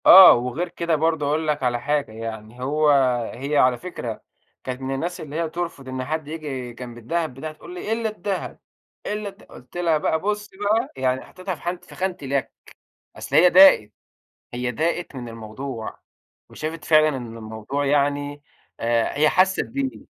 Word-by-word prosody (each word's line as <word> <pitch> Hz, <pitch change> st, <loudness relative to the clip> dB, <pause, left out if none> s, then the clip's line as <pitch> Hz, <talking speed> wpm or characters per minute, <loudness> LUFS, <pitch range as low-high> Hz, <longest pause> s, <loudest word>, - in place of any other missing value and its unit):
آه. 190 Hz, -1 st, +11 dB
وغير 125 Hz, +9 st, -2 dB
كده 170 Hz, -1 st, 0 dB
برضه 160 Hz, -1 st, +1 dB
هاقول 155 Hz, +2 st, 0 dB
لك 150 Hz, -2 st, 0 dB
على 120 Hz, -1 st, +1 dB
حاجة، 145 Hz, -3 st, 0 dB
يعني 110 Hz, +1 st, -7 dB
هو 150 Hz, +3 st, +2 dB, 0.4 s
هي 140 Hz, +4 st, -2 dB
على 125 Hz, -2 st, +4 dB
فكرة 120 Hz, -9 st, -6 dB, 0.4 s
كانت 130 Hz, 0 st, -5 dB
من 135 Hz, 0 st, -2 dB
الناس 170 Hz, +6 st, -3 dB
اللي 150 Hz, -1 st, -8 dB
هي 165 Hz, 0 st, -1 dB
ترفض 170 Hz, -5 st, -5 dB
إن 130 Hz, 0 st, -3 dB
حد 155 Hz, 0 st, -3 dB
ييجي 140 Hz, -6 st, -5 dB
جنب 120 Hz, 0 st, -9 dB
الدهب 160 Hz, +5 st, -2 dB
بتاعها 155 Hz, +4 st, -6 dB
تقول 155 Hz, +3 st, -12 dB
لي: 180 Hz, +4 st, -5 dB
"إلّا 225 Hz, 0 st, 0 dB
الدهب، 205 Hz, -2 st, -4 dB, 0.5 s
إلّا 210 Hz, 0 st, -3 dB
الد" 195 Hz, +1 st, -17 dB
قُلت 125 Hz, +7 st, -12 dB
لها 170 Hz, -3 st, +2 dB
بقى: 160 Hz, +1 st, 0 dB
"بُصّي 210 Hz, +1 st, -3 dB
بقى." 215 Hz, +5 st, +1 dB
يعني 130 Hz, 0 st, +1 dB
حطّيتها 185 Hz, 0 st, -5 dB
في -, -, -18 dB
حانة 175 Hz, +1 st, -3 dB
في -, -, -15 dB
خانة 185 Hz, -1 st, -2 dB
اليَك. 140 Hz, -1 st, -1 dB, 0.6 s
أصل -, -, -5 dB
هي 180 Hz, +3 st, +8 dB
داقت، 180 Hz, -, +7 dB, 0.6 s
هي 125 Hz, 0 st, -1 dB
داقت 165 Hz, +5 st, -1 dB
من 120 Hz, -2 st, -6 dB
الموضوع 115 Hz, +1 st, -7 dB, 0.5 s
وشافت 155 Hz, +1 st, -5 dB
فعلًا 155 Hz, -1 st, +5 dB
إن 120 Hz, -3 st, -7 dB
الموضوع 110 Hz, +6 st, -4 dB
يعني 145 Hz, 0 st, +1 dB, 0.4 s
آآ 115 Hz, +3 st, +1 dB
هي 155 Hz, +1 st, +5 dB
حسِّت 185 Hz, +2 st, +3 dB
بيه، 270 Hz, +1 st, -4 dB
150 Hz, 175 wpm, -23 LUFS, 125-175 Hz, 0.6 s, آه